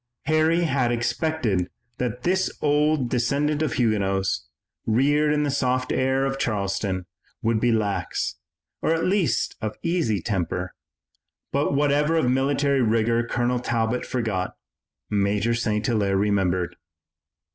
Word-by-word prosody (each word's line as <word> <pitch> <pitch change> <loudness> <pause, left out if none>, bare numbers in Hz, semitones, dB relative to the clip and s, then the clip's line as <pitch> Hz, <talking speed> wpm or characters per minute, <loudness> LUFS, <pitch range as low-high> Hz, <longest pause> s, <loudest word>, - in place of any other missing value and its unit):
Harry 155 +2 +3
had 135 -6 +1
expected 120 - 0 0.3
that 125 0 -3
this 185 +1 +2
old 150 -2 +2
descendant 140 +5 0
of 155 - 0
Huguenots, 100 -5 0 0.4
reared 145 +6 +3
in 150 0 +2
the 145 - 0
soft 130 -2 0
air 130 +1 +1
of 135 0 -2
Charleston, 100 -4 -1 0.4
would 115 0 +2
be 120 +1 +2
lax, 105 -3 -1 0.4
or 165 - +2
at 165 - -1
least 185 -3 +1 0.3
easy 165 - +1
of 90 - -7
temper, 90 -3 -2 0.8
but 140 0 +1
whatever 145 +2 +2
of 130 -7 +2
military 140 +1 +2
rigor 115 +1 +2
Colonel 120 +1 0
Talbot 120 0 -1
forgot, 105 -7 -2 0.5
Major 105 +2 +1
St. 110 -2 -1
Hilaire 100 -5 +1
remembered. 95 -4 0
120 Hz, 125 wpm, -24 LUFS, 105-145 Hz, 0.8 s, Harry